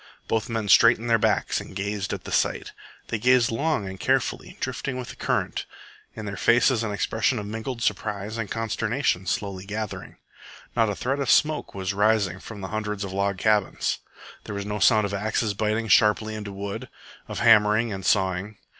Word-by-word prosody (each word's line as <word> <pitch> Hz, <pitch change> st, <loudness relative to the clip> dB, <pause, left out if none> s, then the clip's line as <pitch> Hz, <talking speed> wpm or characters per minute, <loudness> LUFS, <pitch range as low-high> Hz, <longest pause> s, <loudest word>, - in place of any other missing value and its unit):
Both 110 Hz, 0 st, -1 dB
men 115 Hz, -2 st, -2 dB
straightened 115 Hz, +3 st, +5 dB
their 115 Hz, -, +5 dB
backs -, -, +1 dB
and -, -, -11 dB
gazed 100 Hz, -1 st, -3 dB
at -, -, -4 dB
the -, -, -8 dB
sight. -, -, 0 dB, 0.4 s
They 115 Hz, -, -1 dB
gazed 125 Hz, 0 st, +4 dB
long 115 Hz, -3 st, 0 dB
and 95 Hz, 0 st, -7 dB
carefully, -, -, -1 dB
drifting 130 Hz, -2 st, -3 dB
with 125 Hz, -, -6 dB
the -, -, -8 dB
current, -, -, -2 dB, 0.5 s
in 110 Hz, -, -6 dB
their 100 Hz, -1 st, -4 dB
faces 120 Hz, 0 st, +3 dB
an 110 Hz, -2 st, -2 dB
expression 110 Hz, +4 st, 0 dB
of 105 Hz, -, -4 dB
mingled 115 Hz, +3 st, -5 dB
surprise 105 Hz, 0 st, -2 dB
and 110 Hz, -3 st, -3 dB
consternation 115 Hz, -3 st, -1 dB
slowly 100 Hz, -2 st, -2 dB
gathering. 105 Hz, +1 st, -6 dB, 0.6 s
Not 115 Hz, -2 st, +3 dB
a 100 Hz, -, -2 dB
thread 135 Hz, +6 st, -2 dB
of 140 Hz, -, -1 dB
smoke 155 Hz, -6 st, +2 dB
was 95 Hz, 0 st, -2 dB
rising 100 Hz, -3 st, +2 dB
from 105 Hz, 0 st, -9 dB
the 95 Hz, -, -5 dB
hundreds 105 Hz, -1 st, -3 dB
of 95 Hz, -1 st, -5 dB
log 100 Hz, 0 st, 0 dB
cabins. 105 Hz, 0 st, +1 dB, 0.5 s
There 105 Hz, -, -6 dB
was 100 Hz, 0 st, -4 dB
no 105 Hz, 0 st, -3 dB
sound 110 Hz, +2 st, +5 dB
of 100 Hz, -, -4 dB
axes 105 Hz, +1 st, 0 dB
biting 110 Hz, +2 st, -1 dB
sharply 110 Hz, +1 st, +4 dB
into 105 Hz, -2 st, -6 dB
wood, 100 Hz, 0 st, -6 dB, 0.4 s
of -, -, -6 dB
hammering 110 Hz, 0 st, +4 dB
and 95 Hz, 0 st, -6 dB
sawing. 95 Hz, +1 st, 0 dB
105 Hz, 185 wpm, -25 LUFS, 100-115 Hz, 0.6 s, straightened